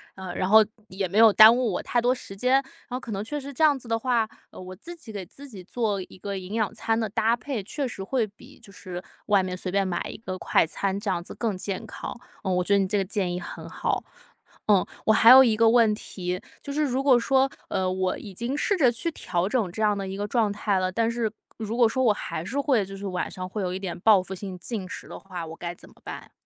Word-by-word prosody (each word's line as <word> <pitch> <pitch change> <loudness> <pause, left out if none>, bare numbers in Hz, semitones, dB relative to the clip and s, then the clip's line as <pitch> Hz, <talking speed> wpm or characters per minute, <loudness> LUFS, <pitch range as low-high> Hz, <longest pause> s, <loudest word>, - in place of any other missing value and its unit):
呃 190 -1 -6
然 185 - -1
后， 215 +2 +7 0.2
也 190 -1 -3
没 195 - -2
有 225 -1 +8
耽 220 +2 +10
误 245 -6 0
我 - - -2
太 245 - +1
多 250 +2 +2
时 220 - -9
间， 260 +5 +3 0.2
呃， 250 - -3
可 250 -3 -8
能 195 -1 -2
确 260 +8 -4
实 280 0 -6
这 275 - -7
样 300 -3 +5
子 245 -3 -12
的 225 0 +1
话， 240 -2 +2 0.3
呃， - - -10
我 185 0 -8
自 345 - -9
己 255 -9 -12
给 200 -3 -6
自 280 +9 -12
己 195 -5 -9
做 205 0 -2
一 - - -15
个 200 +1 -4
营 185 +2 -7
养 220 -1 0
餐 225 0 0
的 220 -2 -1
搭 225 +2 +2
配， 240 -1 -4
确 275 +8 -4
实 235 -6 -6
会 230 +4 0
比 205 0 -16
就 200 - -14
是， 180 -2 -8 0.2
外 200 -2 +3
面 185 0 -4
随 185 - -4
便 195 +1 +1
买 185 -2 -2
一 - - -7
个 185 -4 -6
快 - - +3
餐 190 +4 -2
这 200 - -2
样 175 - -1
子 170 - -10
更 220 -5 -2
健 190 0 -4
康。 - - -7 0.3
呃， 190 - 0
我 180 0 +1
觉 200 - +1
得 200 - +5
你 195 - +1
这 210 - 0
个 195 - +2
建 185 -2 -2
议 180 - -2
很 175 - -7
好。 - - -2 0.6
嗯， 200 -3 +4 0.2
我 220 - +5
还 225 +1 +6
有 260 +2 +11
一 225 -4 +2
个 225 0 +5
问 230 -2 +5
题， 180 -3 -4 0.2
就 280 - -6
是 300 +2 +1
如 265 0 -1
果 260 -3 +6
说， 270 +2 +3 0.2
呃， 190 -2 0
我 185 0 -1
已 200 - -9
经 235 +8 -3
试 400 +6 +1
着 270 -8 +5
去 245 +8 -3
调 180 - -2
整 225 -7 0
这 220 - -4
样 210 -1 +3
的 195 -1 -4
一 190 - -5
个 205 +1 -2
状 225 -3 +2
态 205 -1 0
了， 185 0 0
但 225 +4 +1
是， 230 -2 -1 0.3
如 225 +1 -4
果 240 -2 +6
说 260 +3 0
我 225 -4 +5
还 160 - -5
是 255 +11 -3
会 270 -7 +2
就 195 +1 -9
是 200 - -7
晚 180 -1 -2
上 185 0 -6
会 205 +2 -4
有 180 - -1
一 - - -2
点 190 -3 -5
报 210 -1 +6
复 190 - -7
性 190 -1 -6
进 190 +1 -5
食 - - -8
的 - - -8
话， 180 -3 -7
我 160 0 -8
该 170 0 -5
怎 - - -13
么 - - -20
办？ - - -8
210 Hz, 295 characters per minute, -26 LUFS, 190-235 Hz, 0.6 s, 有